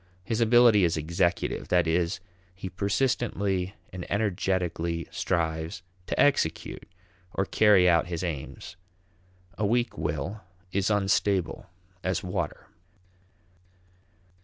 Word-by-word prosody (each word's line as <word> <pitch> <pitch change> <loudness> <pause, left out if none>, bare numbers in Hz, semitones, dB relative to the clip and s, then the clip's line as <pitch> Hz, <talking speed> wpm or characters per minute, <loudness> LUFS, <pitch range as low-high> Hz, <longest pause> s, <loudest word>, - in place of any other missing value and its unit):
His 115 +4 -1
ability 115 -3 +6
is 85 -2 +2
executive; 85 +3 0
that 90 -1 +3
is, 85 +1 0 0.4
he 95 0 -6
persistently 100 -1 0 0.2
and 90 -1 -7
energetically 90 -5 -1
strives 80 -1 -2 0.2
to - - -2
execute 135 - +1 0.5
or 95 - +1
carry 100 -3 +5
out 85 -1 +4
his 85 0 -3
aims. 85 +1 -5 0.8
A - - 0
weak 120 -5 0
will 75 +7 -3 0.3
is 100 +2 +1
unstable 100 -3 +1 0.4
as 95 -1 -1
water. 90 -1 -3
90 Hz, 105 wpm, -27 LUFS, 85-100 Hz, 0.8 s, ability